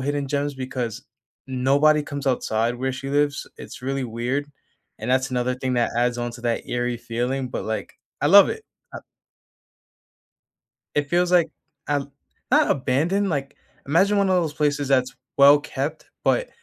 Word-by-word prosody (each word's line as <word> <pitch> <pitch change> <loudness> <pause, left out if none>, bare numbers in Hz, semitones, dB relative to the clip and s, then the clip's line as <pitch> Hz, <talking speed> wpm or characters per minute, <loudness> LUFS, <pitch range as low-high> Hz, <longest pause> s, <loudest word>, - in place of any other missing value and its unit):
hidden 145 +1 -1
gems 145 0 -1
because 125 -1 -4 0.4
nobody 140 +4 +3
comes 140 -1 -6
outside 120 -2 0
where 130 +1 -2
she 130 +1 -6
lives. 145 0 +1
It's - - -10
really 135 0 -2
weird, 125 +5 -2 0.5
and - - -4
that's 130 +1 +2
another 125 0 0
thing 130 0 -2
that 120 -1 +1
adds 120 0 +1
on 120 0 -3
to 120 - -10
that 120 -1 -2
eerie 120 0 -1
feeling, 125 +3 -3
but, - - -4
like, 110 0 -4 0.3
I 145 - +2
love 200 +5 +8
it. 445 0 -5 0.3
Ah - - -4 2.0
It 145 -1 0
feels 175 +2 +1
like 170 -3 +5 0.4
um, 140 -1 -1 0.4
not - - +4
abandoned, 165 +10 +1
like, 140 -2 -3 0.3
imagine 195 +8 +3
one 200 - +2
of 185 - +3
those 165 -4 0
places 145 -2 0
that's 130 -1 +2 0.2
well-kept, 145 +1 +3 0.2
but, - - +2
135 Hz, 160 wpm, -23 LUFS, 125-145 Hz, 2.0 s, love